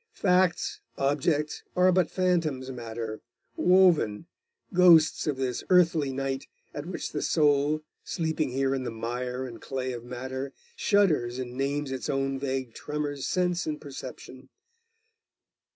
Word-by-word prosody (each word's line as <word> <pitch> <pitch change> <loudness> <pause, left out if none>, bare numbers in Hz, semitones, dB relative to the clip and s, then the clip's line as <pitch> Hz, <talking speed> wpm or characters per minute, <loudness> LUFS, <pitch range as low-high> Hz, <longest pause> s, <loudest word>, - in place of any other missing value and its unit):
Facts, 180 -2 +2 0.2
objects, 145 +2 0
are 185 0 +5
but 180 -2 +2
phantoms 165 -8 0
matter 115 -3 -6 0.3
woven 175 - +4 0.5
ghosts 170 -4 +6
of 145 -3 0
this 130 -2 -2
earthly 165 -6 +4
night, 135 0 -3 0.3
at 145 +2 -6
which 185 - -4
the - - -3
soul, 150 0 +2 0.2
sleeping 160 -2 -1
here 135 +1 0
in 135 - -1
the - - -3
mire 125 +3 -3
and 120 -3 -9
clay 130 -1 -3
of 120 -1 -7
matter, 130 +2 -5 0.2
shudders 155 - +2
and 125 -1 -5
names 140 +2 -2
its 130 -4 -4
own 135 0 0
vague 130 -3 -3
tremors 145 -2 -4
sense 180 -2 0
and 150 -1 -2
perception. 130 -2 -9
140 Hz, 135 wpm, -28 LUFS, 130-165 Hz, 0.5 s, ghosts